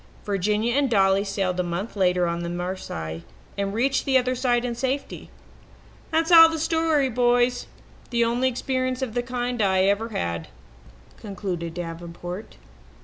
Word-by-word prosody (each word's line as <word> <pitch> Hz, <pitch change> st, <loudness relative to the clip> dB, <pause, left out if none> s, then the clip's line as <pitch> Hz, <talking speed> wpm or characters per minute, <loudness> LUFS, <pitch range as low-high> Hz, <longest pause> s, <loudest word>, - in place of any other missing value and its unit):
Virginia 210 Hz, +3 st, 0 dB
and 280 Hz, -1 st, +2 dB
Dolly 195 Hz, -2 st, +3 dB
sailed 195 Hz, -2 st, -2 dB
a -, -, +4 dB
month 175 Hz, +6 st, -4 dB
later 180 Hz, -2 st, +2 dB
on 170 Hz, 0 st, -2 dB
the 170 Hz, -, -4 dB
Marseilles, 175 Hz, -, -5 dB, 0.3 s
and 200 Hz, 0 st, -2 dB
reached 260 Hz, +6 st, +1 dB
the 265 Hz, -1 st, +3 dB
other 255 Hz, 0 st, +1 dB
side 245 Hz, -1 st, +1 dB
in 240 Hz, -, -2 dB
safety. 265 Hz, +3 st, -3 dB, 0.8 s
That's 325 Hz, +1 st, +1 dB
all 325 Hz, -1 st, +10 dB
the 325 Hz, -, -3 dB
story, 320 Hz, -3 st, +1 dB
boys 245 Hz, 0 st, +2 dB, 0.4 s
the 235 Hz, -1 st, +2 dB
only 240 Hz, +3 st, +1 dB
experience 255 Hz, +1 st, -1 dB
of 240 Hz, -4 st, -4 dB
the 245 Hz, -, 0 dB
kind 245 Hz, -1 st, -3 dB
I 190 Hz, -2 st, +3 dB
ever 200 Hz, +4 st, +1 dB
had," 85 Hz, -, -3 dB, 0.7 s
concluded 180 Hz, -5 st, -5 dB
Davenport. 175 Hz, +3 st, -7 dB
225 Hz, 150 wpm, -24 LUFS, 180-255 Hz, 0.8 s, all